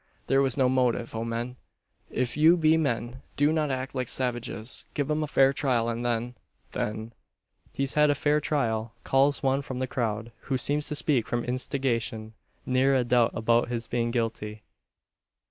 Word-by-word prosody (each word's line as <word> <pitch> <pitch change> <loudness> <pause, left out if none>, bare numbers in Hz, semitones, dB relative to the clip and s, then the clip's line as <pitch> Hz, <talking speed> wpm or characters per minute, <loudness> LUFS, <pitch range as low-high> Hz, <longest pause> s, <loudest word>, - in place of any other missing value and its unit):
There 135 +1 +3
was 135 -1 +1
no 130 -2 +4
motive. 125 -2 +1
O 115 0 -3
men! 120 +2 -4 0.5
if 125 -2 -1
you 160 +3 +6
be 160 -1 +4
men, 120 -5 -1 0.2
do 145 +2 +3
not 155 -2 0
act 130 0 -3
like 130 -2 -2
savages. 120 -2 -2
Give 145 0 -1
him 150 +1 0
a 155 - -1
fair 135 -1 +4
trial, 125 -4 +1
and 115 +1 -3
then 120 0 -1 0.4
then 110 +2 -4 0.3
" - - -37
"He's 135 0 0
had 150 0 +4
a 145 - +3
fair 150 +2 +1
trial," 115 -7 -1
calls 140 +2 +2
one 135 +1 +2
from 130 -2 -6
the 130 - -1
crowd, 115 -2 -3
who 135 - 0
seems 145 +3 0
to 150 - -2
speak 145 -5 +1
from 120 0 -1
instigation; 125 -3 -2 0.3
"Ne'er 130 +2 +3
a 130 - +3
doubt 120 -1 +2
about 115 +1 +2
his 120 -1 -3
being 120 0 -1
guilty. 110 -2 -3
125 Hz, 180 wpm, -27 LUFS, 115-140 Hz, 0.5 s, you